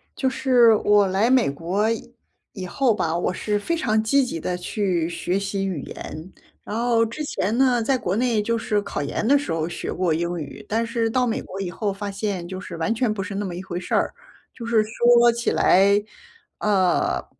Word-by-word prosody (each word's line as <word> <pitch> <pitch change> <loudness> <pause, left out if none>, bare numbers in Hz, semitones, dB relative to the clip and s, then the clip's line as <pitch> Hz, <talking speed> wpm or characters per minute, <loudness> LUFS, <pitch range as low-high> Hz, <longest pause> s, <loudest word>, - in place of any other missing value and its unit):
就 265 - 0
是 245 -4 +4
我 205 -1 +3
来 195 +5 +1
美 255 - +4
国 175 +9 -1 0.7
以 190 -3 -6
后 240 +6 +1
吧， 165 -5 -1
我 180 - -1
是 210 +2 -1
非 335 +11 -1
常 220 -8 +1
积 270 +5 +3
极 165 -10 -4
地 180 +3 -3
去 180 -2 -1
学 180 +2 -2
习 195 0 -2
语 180 -7 -3
言。 160 +5 -8 0.3
然 210 - -5
后 235 -1 +2
之 230 +7 -5
前 225 -5 -1
呢 255 -3 +3
在 260 +4 +1
国 195 -6 -2
内 235 -1 +1
就 230 +3 0
是 215 -2 0
考 150 - -4
研 145 +9 -2
的 280 - +5
时 280 - -4
候 165 -1 -1
学 - - -5
过 180 -3 0
英 170 +2 -2
语， 150 +6 -8
但 225 +2 0
是 230 -1 -1
到 250 +2 +1
美 225 - -1
国 190 - -8
以 180 -2 -3
后 205 +2 -2
发 200 +1 -5
现 195 -3 -3
就 185 +1 -6
是 170 - -8
完 165 +7 0
全 230 -2 0
不 200 -2 -4
是 195 +1 -6
那 205 +1 -2
么 180 -2 -5
一 180 - -6
回 180 -2 -5
事 180 - -2
儿， - - +1 0.4
就 235 - -8
是 225 -2 +3
说 235 +2 +4
起 235 0 -1
来， 200 +2 +4 0.6
呃， 190 -4 +1
205 Hz, 230 characters per minute, -23 LUFS, 180-235 Hz, 0.7 s, 的